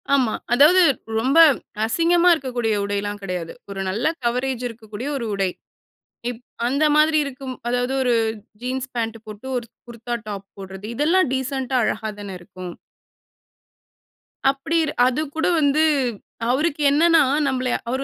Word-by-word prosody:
ஆமா. 250 -5 +2 0.2
அதாவது 310 +8 +6 0.4
ரொம்ப 265 +7 +1 0.5
அசிங்கமா 340 +7 +3
இருக்கக்கூடிய 245 -7 -1
உடைலாம் 205 0 -3
கெடையாது. 180 -3 -4 0.2
ஒரு 195 -1 -4
நல்ல 215 +6 -2 0.2
கவரேஜ் 250 +1 -1
இருக்கக்கூடிய 225 +2 -8
ஒரு 235 - -4
உடை. 195 -2 0 0.8
இப் 245 -1 -8 0.3
அந்த 280 +5 +1
மாதிரி 310 0 +4
இருக்கும். 265 -1 -6
அதாவது 245 +1 0
ஒரு 250 -2 +2 0.5
ஜீன்ஸ் 260 +1 -3
பாண்ட் 225 -1 -2
போட்டு 215 +4 -10
ஒரு 240 - -3 0.2
குர்தா 235 0 -5
டாப் 200 -1 -6
போடுறது 190 +1 -8
இதெல்லாம் 330 +6 +3
டீசென்ட்டா 265 0 -2
அழகா 220 0 -1
தானே 195 -2 -6
இருக்கும்? 180 0 -9 1.8
அப்டிரு 305 +3 0 0.2
அது 260 +4 0
கூட 320 - +1
வந்து 295 +1 +3 0.7
அவருக்கு 300 +2 0
என்னனா 325 +2 +5 0.3
நம்மளய 255 -2 0
அவர் 260 +2 -1
250 Hz, 130 wpm, -22 LUFS, 220-280 Hz, 1.8 s, அதாவது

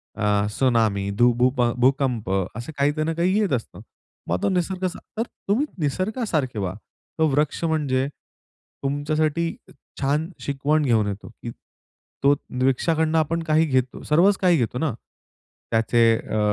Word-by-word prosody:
अ, - - -7 0.3
tsunami, 110 -4 +1
धू 120 +1 +5
भूप 125 +1 +2 0.2
भूकंप 130 -5 +1 0.3
असे 120 +8 -6
काही 140 +1 +3
त - - -3
ना 165 - 0
काही 185 +5 +2
येत 200 -8 +1
असतं. 120 -3 -3 0.5
मग 90 +2 0
तो - - +3
निसर्ग 185 0 -1
असा 185 0 -3 0.2
तर 225 - +1 0.3
तुम्ही 235 +9 +3
निसर्गासारखे 160 - -1
व्हा. 95 -2 -2 0.5
तो 160 - +4
वृक्ष 150 +3 0
म्हणजे 145 -5 +1
तुमच्यासाठी 150 - -3 0.5
छान 150 +4 0
शिकवण 145 +2 0
घेऊन 110 -5 +2
येतो, 100 +2 -5
की 115 +1 -9 0.7
तो 140 +1 +6 0.3
वृक्षाकडून 160 +4 +1
आपण 165 +1 +1
काही 160 0 +3
घेतो, 130 -4 -1
सर्वच 185 +6 +4
काही 180 -3 +4
घेतो 125 -2 -1
ना. 155 -4 0 0.8
त्याचे 115 +1 +3
अ, 110 - -3
145 Hz, 145 wpm, -23 LUFS, 125-165 Hz, 0.8 s, तो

